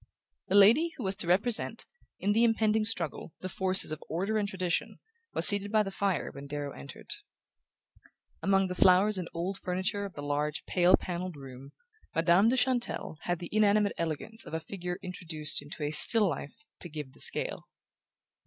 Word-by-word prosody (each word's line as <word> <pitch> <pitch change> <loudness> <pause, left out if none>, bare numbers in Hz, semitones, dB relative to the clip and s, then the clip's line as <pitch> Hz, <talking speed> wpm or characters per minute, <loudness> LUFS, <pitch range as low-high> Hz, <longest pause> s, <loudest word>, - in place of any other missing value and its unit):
The 195 - 0
lady 240 +12 +5
who 255 - -6
was 190 0 -1
to 190 - -3
represent, 210 +6 +1 0.3
in 200 - 0
the 225 +3 +3
impending 220 -1 +2
struggle, 175 -7 -1
the 185 - -4
forces 190 -2 +4
of 155 - -5
order 195 +7 -1
and 200 -1 -2
tradition 180 -3 -2 0.4
was - - +6
seated 205 0 +3
by 215 -1 +3
the 195 - -6
fire 195 -2 -2
when 140 +1 -10
Darrow 145 0 -5
entered. 140 - -11 1.3
Among 195 0 +2
the 180 - -4
flowers 185 +3 +4
and 175 - -6
old 185 +4 -4
furniture 185 +3 -2
of 195 - -9
the 145 - -7
large 145 +1 -2
pale 180 0 +4
panelled 180 -1 -5
room, 135 -1 -11 0.5
Madame 170 +6 +4
de 260 - +1
Chantelle 245 -10 -1
had 175 0 -1
the 175 0 -8
inanimate 210 -1 +3
elegance 170 +7 -4
of - - -7
a - - -1
figure 180 +1 -6
introduced 165 -5 -1
into 150 +1 -7
a 145 - -2
"still 210 +7 +5
life" 165 - -6
to 175 - -4
give 150 -4 -8
the - - -19
scale. - - -2
185 Hz, 180 wpm, -29 LUFS, 160-205 Hz, 1.3 s, was